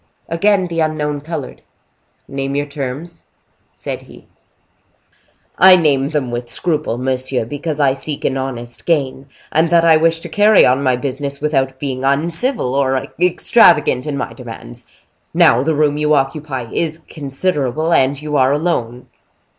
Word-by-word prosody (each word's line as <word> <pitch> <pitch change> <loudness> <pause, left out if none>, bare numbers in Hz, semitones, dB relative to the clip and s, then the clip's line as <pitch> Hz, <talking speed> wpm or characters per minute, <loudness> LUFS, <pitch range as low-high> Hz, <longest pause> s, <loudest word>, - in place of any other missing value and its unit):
Again 195 +3 +2
the 170 -1 -4
unknown 150 -2 -1
colored. 150 -3 -6 0.7
"Name 135 0 -4
your 145 0 0
terms," 145 +4 -7 0.5
said - - -6
he. - - -16 1.3
"I 185 0 +9
name 145 -6 +2
them 145 -5 -2
with 120 0 -5
scruple, 150 -2 -1
monsieur, 130 -1 -2
because 145 +4 -4
I 135 -2 +3
seek 140 +2 -6
an 130 - 0
honest 120 -3 -5
gain, 140 -4 -1 0.2
and 160 +2 +2
that 170 0 +4
I 160 -1 +6
wish 165 +1 +2
to - - -5
carry 210 0 +5
on 130 +2 +2
my 130 -2 +2
business 140 +2 -4
without 135 -3 -1
being 130 -2 -4
uncivil 160 - 0
or 135 -1 +1 0.3
extravagant 170 - +3
in 145 -2 -3
my - - -4
demands. - - -11 0.5
Now 115 - +5
the 155 +3 0
room 150 0 +1
you 150 0 +2
occupy 135 -3 -2
is 160 -1 -1
considerable, 150 +1 -2
and 135 -1 +2
you 150 0 -4
are 130 0 +3
alone." 140 -6 -2
145 Hz, 150 wpm, -17 LUFS, 130-160 Hz, 1.3 s, I